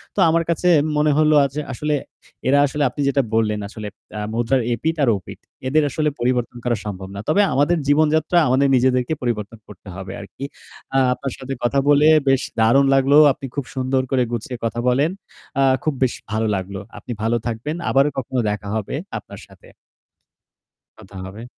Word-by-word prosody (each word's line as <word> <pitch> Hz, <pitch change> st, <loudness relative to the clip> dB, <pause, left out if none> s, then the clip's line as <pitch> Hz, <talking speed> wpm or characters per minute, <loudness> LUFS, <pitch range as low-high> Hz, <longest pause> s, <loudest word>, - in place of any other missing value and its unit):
তো -, -, -2 dB
আমার 165 Hz, +1 st, +2 dB
কাছে 170 Hz, +2 st, 0 dB, 0.3 s
মনে 150 Hz, 0 st, +3 dB
হলো 155 Hz, 0 st, +4 dB
আ -, -, +3 dB
যে, 150 Hz, -, -1 dB
আসলে 150 Hz, +4 st, -2 dB, 0.5 s
এরা 140 Hz, +2 st, +4 dB
আসলে, 145 Hz, +1 st, -2 dB
আপনি 145 Hz, -, -5 dB
যেটা 140 Hz, 0 st, +2 dB
বললেন, 105 Hz, -2 st, +1 dB
আসলে 105 Hz, 0 st, -8 dB, 0.5 s
মুদ্রার 120 Hz, +3 st, +1 dB
এপিঠ 160 Hz, +8 st, -1 dB
আর 125 Hz, -, +3 dB
ওপিঠ। 90 Hz, -, -11 dB, 0.3 s
এদের 155 Hz, +3 st, +3 dB
আসলে 150 Hz, +2 st, 0 dB
পরিবর্তন 120 Hz, 0 st, -1 dB
করা 120 Hz, -2 st, +1 dB
সম্ভব 95 Hz, -2 st, -6 dB
না। -, -, -5 dB
তবে 200 Hz, +7 st, +4 dB
আমাদের 145 Hz, +5 st, +2 dB
জীবনযাত্রা, 155 Hz, +3 st, +3 dB
আমাদের 135 Hz, +2 st, +3 dB
নিজেদেরকে 125 Hz, +3 st, +2 dB
পরিবর্তন 115 Hz, -2 st, -3 dB
করতে 100 Hz, 0 st, -15 dB
হবে 95 Hz, 0 st, -7 dB
আর -, -, -8 dB
কি। 135 Hz, -, -8 dB, 0.7 s
আপনার 135 Hz, -1 st, -5 dB
সাথে 135 Hz, 0 st, -5 dB
কথা 135 Hz, +3 st, +2 dB
বলে 145 Hz, +1 st, +5 dB, 0.2 s
বেশ 135 Hz, -1 st, +3 dB, 0.2 s
দারুণ 120 Hz, +5 st, +5 dB
লাগল। 135 Hz, +1 st, +3 dB, 0.2 s
আপনি 135 Hz, -, -9 dB
খুব 140 Hz, -3 st, -2 dB
সুন্দর 130 Hz, 0 st, 0 dB
করে 130 Hz, -2 st, +3 dB
গুছিয়ে 120 Hz, +2 st, -4 dB
কথা 115 Hz, +1 st, -2 dB
বলেন। 140 Hz, +7 st, +2 dB, 0.5 s
আ -, -, +5 dB, 0.2 s
খুব 155 Hz, -, 0 dB
বেশি 125 Hz, -, 0 dB
ভালো 110 Hz, 0 st, 0 dB
লাগল। 95 Hz, +1 st, -5 dB, 0.2 s
আপনি -, -, -8 dB
ভালো 115 Hz, +2 st, +1 dB
থাকবেন। 120 Hz, +8 st, -3 dB
আবারও 140 Hz, +2 st, +3 dB
কখনো 130 Hz, -1 st, -2 dB
দেখা 105 Hz, 0 st, -4 dB
হবে 110 Hz, -, -3 dB, 0.2 s
আপনার -, -, -12 dB
সাথে। -, -, -19 dB, 1.3 s
কথা 100 Hz, -2 st, -15 dB
হবে। 105 Hz, +5 st, -9 dB
130 Hz, 180 wpm, -21 LUFS, 115-145 Hz, 1.3 s, বলে